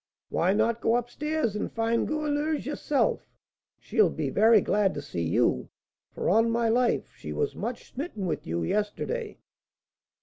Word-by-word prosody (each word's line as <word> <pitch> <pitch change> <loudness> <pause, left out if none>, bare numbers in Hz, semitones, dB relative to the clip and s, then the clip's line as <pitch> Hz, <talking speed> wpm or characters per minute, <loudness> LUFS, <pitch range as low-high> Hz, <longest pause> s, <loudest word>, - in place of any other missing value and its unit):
Why 180 +3 +2
not 225 +3 +1
go 230 - +3
up 245 0 -1
stairs, 300 -6 -1
and 210 - -3
find 230 +1 0
Goualeuse 300 0 -1
yourself; 290 -1 0 0.5
she'll - - +2
be - - -3
very 220 +1 +6
glad 200 0 +1
to 145 - -4
see 90 -11 -4
you, 80 -5 +1 0.4
for, - - -4
on 225 +5 +4
my 230 0 +1
life, 240 +1 +1
she - - -8
was 440 - -1
much 235 +4 -5
smitten 255 - -4
with 170 - -3
you 85 +1 -1
yesterday?" 210 - -2
230 Hz, 160 wpm, -27 LUFS, 205-290 Hz, 0.5 s, very